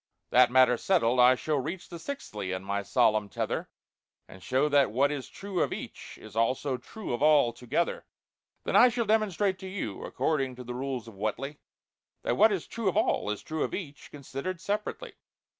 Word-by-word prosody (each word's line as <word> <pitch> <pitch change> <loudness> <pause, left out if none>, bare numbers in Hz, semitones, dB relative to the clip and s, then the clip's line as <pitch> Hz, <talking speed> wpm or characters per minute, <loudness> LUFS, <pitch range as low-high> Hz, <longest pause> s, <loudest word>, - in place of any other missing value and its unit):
"That 125 0 +6
matter 125 -1 +5
settled, 125 -7 +2
I 125 +1 +7
shall 150 +2 -1
reach 165 +7 -5
The 170 - -8
'Sixthly' 105 - -5
in 95 0 -3
my 100 +1 -2
solemn 105 +1 +2
tether, - - -3 0.6
And 95 - -13
show 130 +8 +1
that 145 -2 +4
what 140 +5 +2
is 140 -3 -5
true 195 -2 -4
of - - +1
each, - - -7
Is 110 -1 -13
also 130 +4 +1
true 215 - -7
of 120 - -3
all, 145 -5 +5
together. 125 +8 -2 0.6
"Then - - -2
I 250 - +8
shall 235 -1 -1
demonstrate 205 -3 +1
to 190 - -7
you, 185 - -5
According 135 -1 -1
to 125 - -8
the 125 0 -6
rules 130 -2 -4
of 115 - -10
WHATELY, 110 +8 -4 0.6
That - - 0
what 220 +2 +6
is 190 -5 -2
true 225 -4 -1
of - - -2
all, - - +1
is 105 - -3
true 160 -1 -4
Of - - -2
each, 155 -6 -8
considered 145 +5 -6
separately." 210 - -3
140 Hz, 190 wpm, -29 LUFS, 120-185 Hz, 0.6 s, I